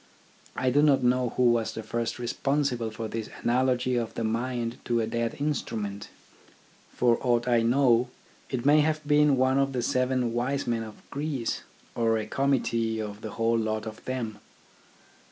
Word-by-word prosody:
I 130 -1 +1
do 145 +3 +4
not 140 -3 +4
know 125 0 +2
who 125 -1 +5
was 115 -1 0
first 115 +1 -3
responsible 125 -1 -1
for 110 +1 -5
this 110 0 -5
analogy 125 +1 +2
of 115 -2 -3
the 115 - -2
mind 120 +1 -2
to 120 -1 +1
a 115 - +1
dead 115 0 -2
instrument. 110 -9 -3 0.8
For 120 -1 +2
aught 120 -1 +1
I 120 -2 +4
know, 120 0 +3 0.4
it 130 -2 -3
may 150 +2 +6
have 155 0 0
been 150 -2 +4
one 130 +1 +3
of 135 0 +1
the 125 -2 -1
seven 125 -1 +1
wise 130 +4 -1
men 115 -1 0
of 110 -1 -10
Greece, 140 -5 -2 0.3
or 115 -1 +1
a 110 - -3
committee 115 -3 0
of 105 -1 -5
the 110 - -6
whole 115 0 +1
lot 110 0 -2
of 110 0 -8
them. 120 -5 -4
120 Hz, 170 wpm, -27 LUFS, 115-130 Hz, 0.8 s, may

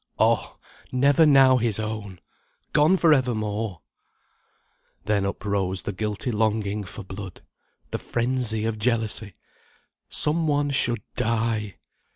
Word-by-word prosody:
_ - - -29
Oh! - - +1 0.3
never 140 +5 +4
now 135 -3 +6
his 115 -3 0
own! 105 -4 -5 0.5
Gone 155 +5 +4
for 165 -3 +5
evermore! 110 - -1 1.2
Then 100 -1 +1
uprose 100 -2 -2
the 100 - -4
guilty 105 +5 -3
longing 105 -1 -1
for 100 +3 -9
blood! 95 -1 -9 0.5
The - - -3
frenzy 120 -2 -1
of 110 -1 -2
jealousy! 110 -3 -1 0.8
Some 160 +2 +3
one 145 -1 +1
should 120 -5 +1
die. 110 -3 -1
110 Hz, 120 wpm, -24 LUFS, 105-130 Hz, 1.2 s, now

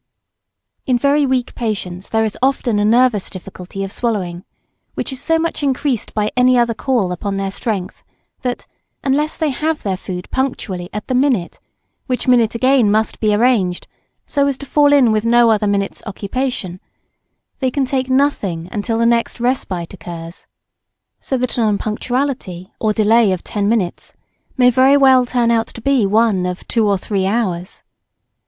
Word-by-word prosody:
In 255 -2 +3
very 280 +3 +2
weak 255 -2 -1
patients 195 -5 -4
there 220 0 +1
is 215 -2 -2
often 255 -5 +1
a 205 - +2
nervous 230 -2 +3
difficulty 185 +1 -8
of 195 - -5
swallowing, 185 -8 -2 0.5
which - - -3
is 265 - -5
so 325 0 +2
much 330 -1 -2
increased 270 -3 -1
by 210 0 0
any 250 0 +4
other 235 -1 +2
call 230 -7 0
upon 195 +2 -3
their 195 0 -2
strength 195 -3 -4 0.4
that, 250 -1 -3 0.4
unless 290 +3 0
they 315 -3 0
have 310 +3 -2
their 195 -2 -1
food 180 -1 -6
punctually 195 -9 -3
at 210 0 -5
the - - -3
minute, 250 -9 +1 0.5
which 255 -1 -2
minute 240 -3 +3
again 255 -2 +3
must 215 +1 0
be 215 -1 +2
arranged 210 -5 +1 0.4
so 280 -1 +1
as 275 -2 -1
to 280 - -9
fall 290 +1 +3
in 270 -5 +5
with 215 0 +1
no 235 0 +4
other 210 -1 +1
minute's 200 -1 -1
occupation, 205 -3 -3 0.8
they 260 - +1
can 270 +1 0
take 260 0 -1
nothing 215 - 0
till 225 +1 -1
the 230 - +2
next 235 +1 +1
respite 200 -9 -2
occurs 170 -1 -9 0.7
so 265 - -2
that 250 0 -2
an - - +3
unpunctuality 215 -2 -2
or 215 - +1
delay 215 0 +3
of 185 -2 -2
ten 205 -1 -1
minutes 205 -6 -2 0.4
may 250 -1 +5
very 265 +3 +5
well 260 -2 +5
turn 240 -2 +1
out 230 -1 +1
to - - -11
be 260 -4 +2
one 205 -3 +2
of 180 0 -6
two 225 -3 +1
or 200 -1 +2
three 190 0 -1
hours. 190 -5 -2
230 Hz, 170 wpm, -18 LUFS, 195-255 Hz, 0.8 s, in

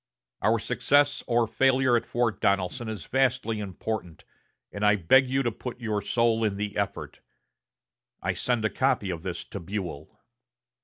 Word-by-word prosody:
Our - - +3
success 145 0 +2
or 120 -1 +3
failure 130 +1 +3
at 120 - 0
Fort 120 -2 -1
Donelson 100 +5 0
is 105 -5 -6
vastly 125 -4 +1
important, 100 -3 -5 0.5
and 100 - -5
I 105 0 +5
beg 125 +8 +4
you 135 +1 +1
to 120 - 0
put 125 +2 -7
your 110 -3 -1
soul 115 +1 +1
in 105 -2 0
the 105 0 -3
effort. 100 -1 -3 1.0
I - - -1
send 120 -3 -1
a 110 - +1
copy 95 +1 +1
of 85 -2 -5
this 90 0 -5
to 100 - -7
Buell." 85 -5 -6
110 Hz, 160 wpm, -27 LUFS, 100-125 Hz, 1.0 s, I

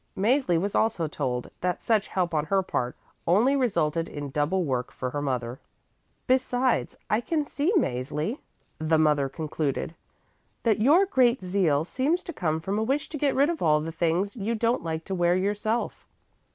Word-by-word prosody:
Mäzli 210 - +2
was 200 +3 -2
also 215 -8 +1
told 130 -5 -3
that 180 -1 -1
such 215 -3 +2
help 180 -3 -1
on 150 -1 +1
her 195 +3 +1
part 125 -8 -2 0.3
only 220 +11 +4
resulted 165 - 0
in 145 -2 -6
double 155 +7 +1
work 130 -5 -2
for 125 -1 -4
her 145 - -3
mother. 125 -3 -2 0.7
"Besides 255 -1 +1
I 215 - +1
can 305 +3 -1
see 290 +5 0
Mäzli," 150 - -1 0.4
the 155 0 +2
mother 150 -3 +3
concluded, 155 0 -3 0.7
"that 220 -3 +2
your 315 - +5
great 255 - +2
zeal 180 -6 +1
seems 290 - 0
to 345 - -7
come 160 - -1
from 195 +6 -2
a - - +1
wish 275 +5 -1
to 310 - -5
get 280 -1 +1
rid 285 +5 +4
of 330 - -5
all 150 -1 +4
the 160 +2 -4
things 175 +5 0
you 225 +1 -2
don't 230 +2 +1
like 160 -1 -3
to 195 - -4
wear 175 -1 +2
yourself. 210 +4 -1
185 Hz, 180 wpm, -26 LUFS, 155-240 Hz, 0.7 s, your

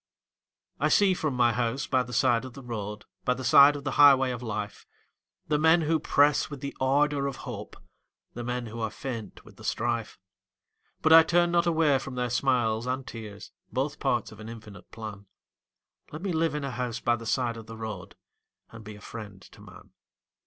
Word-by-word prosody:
I - - +2
see 200 -3 +4
from 155 -6 -2
my 120 -1 +3
house 125 +4 -1
by 130 -1 +1
the 125 0 -7
side 125 -2 +2
of 130 -2 -9
the 135 - -11
road 105 -3 -6 0.2
By 125 - +1
the 130 - -7
side 140 +3 +7
of 145 - -7
the 140 - -2
highway 135 -2 +7
of 125 -1 -5
life, 105 -3 -5 0.6
The 150 -1 +1
men 160 +2 +5
who 160 +1 +1
press 145 -1 +3
with 145 -2 -7
the 140 0 -6
ardor 140 +1 +2
of 135 - -4
hope, - - -7 0.6
The 120 - -6
men 125 0 -3
who 115 +1 -8
are 110 -1 -1
faint 115 -1 -7
with - - -17
the - - -14
strife, 115 -1 -2 0.9
But 160 - +5
I 165 - +11
turn 175 +1 +2
not 170 0 +2
away 160 -5 +3
from 135 -1 -7
their 125 -1 -2
smiles 120 -3 +1
and 130 +1 -2
tears, 110 -4 -9 0.2
Both - - -2
parts - - -1
of - - -13
an 110 +1 -8
infinite 105 -5 -11
plan 105 -3 -9 0.8
Let 155 +4 -8
me 195 -3 -1
live 160 -2 0
in 150 - -3
a 140 - -3
house 120 -1 -3
by 120 0 +1
the 115 -1 -8
side 120 -2 0
of 115 -1 -10
the 115 0 -9
road 105 -5 -7 0.6
And 115 -1 -11
be 105 0 -9
a 105 - -14
friend 105 -4 -9
to - - -17
man. - - -15
125 Hz, 205 wpm, -27 LUFS, 115-145 Hz, 0.9 s, I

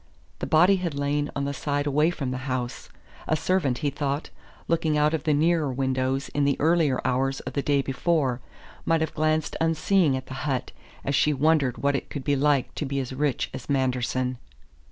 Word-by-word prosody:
The - - -3
body 180 +5 +5
had 175 -5 -3
lain 145 +1 0
on 140 - -1
the 140 - -2
side 145 +1 -2
away 150 +3 +3
from 140 -7 -3
the 130 +1 -5
house; 125 -1 -3 0.4
a 155 - +2
servant, 155 -6 +1
he 145 - +2
thought, 140 +1 -3 0.4
looking 160 -2 +1
out 150 +1 +3
of 155 -2 -2
the 155 - +3
nearer 160 -1 +2
windows 130 +1 -1
in 145 - 0
the 140 -1 +1
earlier 155 -4 +3
hours 135 +1 0
of - - -7
the 140 - 0
day 140 -1 +1
before, 135 -3 0 0.4
might 165 -1 +2
have 160 - -1
glanced 155 0 0
unseeing 165 -2 +2
at 130 - -7
the - - -8 0.2
hut, 130 -2 -2 0.3
as 140 - 0
she 150 +2 +3
wondered 145 -3 +2
what 140 0 +1
it - - -4
could 140 - -5
be 145 0 +1
like 140 -1 +1
to 150 - -3
be 140 0 -2
as 130 -1 -4
rich 140 -1 -1
as 130 0 -8
Manderson. 130 -2 0
140 Hz, 200 wpm, -25 LUFS, 130-155 Hz, 0.4 s, body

